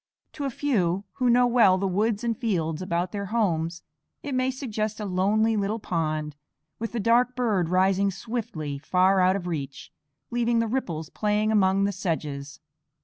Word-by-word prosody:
To 290 -2 -4
a - - 0
few, 200 -9 0
who 250 -1 +2
know 245 +1 +5
well 230 -6 +5
the 195 - -1
woods 210 +4 0
and 235 -1 0
fields 175 -9 -1
about 175 -1 -1
their 200 -1 -4
homes, 170 -6 -1 0.4
it 285 - -4
may 255 0 +1
suggest 220 -5 -3
a 210 - -3
lonely 205 +4 +2
little 205 +1 -1
pond, 155 -6 -2 0.4
with 230 +1 -4
a - - 0
dark 240 +4 +3
bird 210 -9 +1
rising 190 +2 +3
swiftly, 190 - -4
far 185 +5 +3
out 185 +1 +4
of 195 -3 -4
reach, 140 -6 -5 0.4
leaving 240 0 +1
the 230 - +2
ripples 175 - -3
playing 210 0 0
among 195 -2 +3
the 200 - +1
sedges. 150 -7 -4
200 Hz, 170 wpm, -26 LUFS, 175-230 Hz, 0.4 s, know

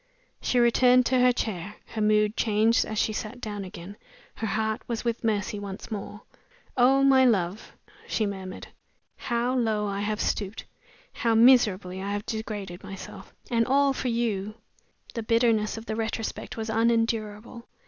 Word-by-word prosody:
She 250 - 0
returned 250 +1 +5
to 255 +1 +2
her 250 0 +5
chair. 210 -4 -4
Her 220 - -4
mood 210 0 +3
changed 220 +1 +2
as 215 - -5
she 215 - +1
sat 215 +3 -5
down 210 -4 -5
again 185 +2 -9 0.4
her 220 - -4
heart 220 +1 -1
was 235 -1 -3
with 235 0 -1
Mercy 210 -2 -1
once 200 +1 -8
more. 205 0 -6 0.5
"Oh, 265 +2 +4
my 265 -1 +6
love!" 205 -4 0 0.3
she 220 - 0
murmured 190 -2 -6 0.5
"how 240 0 -1
low 220 -4 +1
I 200 -1 -2
have 210 +1 -2
stooped, 205 +1 -2 0.5
how 230 -1 +1
miserably 210 -6 +4
I 200 +1 -3
have 205 +1 -3
degraded 205 -5 -5
myself 195 -1 -9 0.2
and 230 -1 +2
all 275 +1 +3
for 260 - -3
You!" 215 -4 -1 0.6
The 230 - -3
bitterness 225 -1 +2
of 225 - -8
the 220 - -3
retrospect 225 0 -4
was 220 0 -3
unendurable. 225 0 -1
220 Hz, 160 wpm, -26 LUFS, 205-235 Hz, 0.6 s, my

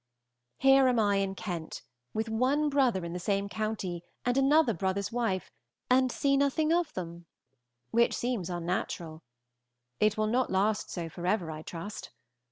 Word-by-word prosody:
Here 270 0 +6
am 250 -1 +2
I 205 -2 +3
in 195 -1 -1
Kent, 175 -5 -5 0.3
with 220 +1 -2
one 260 +7 +1
brother 255 -10 +2
in 170 - -5
the 180 - -3
same 200 +2 0
county 200 -5 -3 0.2
and 245 0 +2
another 275 -1 +4
brother's 190 +2 -2
wife, 230 -6 -1 0.4
and 255 0 +4
see 275 +2 +1
nothing 285 +3 +2
of 345 -2 +1
them, 170 -1 -6 0.6
which 235 +1 +3
seems 235 -8 -2
unnatural. 170 -2 -3 0.8
It 215 0 +3
will 215 - +2
not 245 +4 +1
last 205 +3 +1
so 170 -2 -4
forever, 175 +1 -1
I 155 0 -7
trust. 170 +6 -7
215 Hz, 155 wpm, -30 LUFS, 180-255 Hz, 0.8 s, Here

